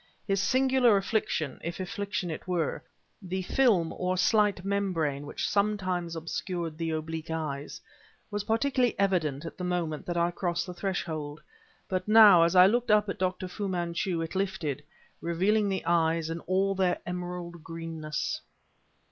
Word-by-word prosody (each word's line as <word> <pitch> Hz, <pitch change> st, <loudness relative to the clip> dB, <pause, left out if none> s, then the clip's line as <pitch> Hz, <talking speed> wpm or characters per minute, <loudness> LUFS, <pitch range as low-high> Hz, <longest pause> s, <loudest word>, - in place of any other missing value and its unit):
His 195 Hz, -1 st, +1 dB
singular 260 Hz, -2 st, +4 dB
affliction 195 Hz, -, -1 dB
(if 170 Hz, +3 st, -4 dB
affliction 200 Hz, -2 st, -3 dB
it 155 Hz, -, -7 dB
were), 175 Hz, -4 st, -1 dB, 0.4 s
the 185 Hz, 0 st, -3 dB
film 195 Hz, -7 st, +2 dB
or 185 Hz, 0 st, -1 dB
slight 205 Hz, -2 st, +2 dB
membrane 165 Hz, -8 st, -1 dB
which -, -, -3 dB
sometimes 185 Hz, -5 st, 0 dB
obscured 165 Hz, 0 st, -4 dB
the 165 Hz, 0 st, -3 dB
oblique 160 Hz, 0 st, -4 dB
eyes, 150 Hz, -3 st, -4 dB, 0.5 s
was 205 Hz, 0 st, -3 dB
particularly 250 Hz, +2 st, +1 dB
evident 170 Hz, -7 st, 0 dB
at 165 Hz, -, -8 dB
the -, -, -4 dB
moment 175 Hz, -4 st, -2 dB
that 175 Hz, -1 st, -2 dB
I 170 Hz, +1 st, +2 dB
crossed 175 Hz, -1 st, -2 dB
the 180 Hz, -, -7 dB
threshold, 165 Hz, -5 st, -3 dB, 0.5 s
but 185 Hz, +1 st, -2 dB
now, 210 Hz, -5 st, +8 dB
as 170 Hz, +2 st, +3 dB
I 180 Hz, 0 st, +9 dB
looked 235 Hz, +4 st, +2 dB
up 210 Hz, -1 st, +4 dB
at -, -, -4 dB
Dr. 185 Hz, 0 st, -1 dB
Fu 200 Hz, +3 st, -4 dB
Manchu, 175 Hz, -1 st, -1 dB
it 165 Hz, -, -6 dB
lifted 185 Hz, -7 st, -2 dB, 0.4 s
revealing 200 Hz, +5 st, +1 dB
the 190 Hz, -1 st, -2 dB
eyes 165 Hz, -1 st, +2 dB
in 165 Hz, -, -3 dB
all 190 Hz, +2 st, +2 dB
their 185 Hz, -2 st, +1 dB
emerald 175 Hz, -1 st, -5 dB
greenness. 165 Hz, -2 st, -4 dB
180 Hz, 155 wpm, -28 LUFS, 165-200 Hz, 0.5 s, I